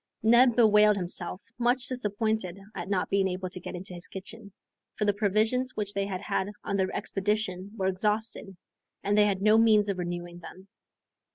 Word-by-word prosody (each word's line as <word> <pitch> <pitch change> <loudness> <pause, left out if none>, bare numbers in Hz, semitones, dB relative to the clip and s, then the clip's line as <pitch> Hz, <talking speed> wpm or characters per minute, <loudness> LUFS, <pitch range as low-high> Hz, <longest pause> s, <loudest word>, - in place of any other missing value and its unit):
Neb 240 +2 +5
bewailed 210 -2 +5
himself, 180 0 -4 0.2
much 245 +1 +1
disappointed 215 -5 -1
at - - -6
not 195 -2 0
being 195 -1 +2
able 185 0 -4
to 180 - -6
get 180 - -7
into 180 +1 -7
his 175 0 -5
kitchen, 200 +2 -9 0.4
for 210 - -1
the 205 - +3
provisions 220 +5 +1
which 205 -1 -3
they 200 0 -1
had 190 -2 -4
had 190 - -1
on - - -2
their 190 -1 +1
expedition 195 -1 -2
were 190 - -1
exhausted, 210 0 -1 0.5
and 205 +1 +1
they 210 0 +5
had 195 -1 -1
no 215 +1 +5
means 215 -2 +4
of 190 -2 -2
renewing 175 0 -5
them. 185 +3 -12
200 Hz, 180 wpm, -28 LUFS, 185-215 Hz, 0.5 s, Neb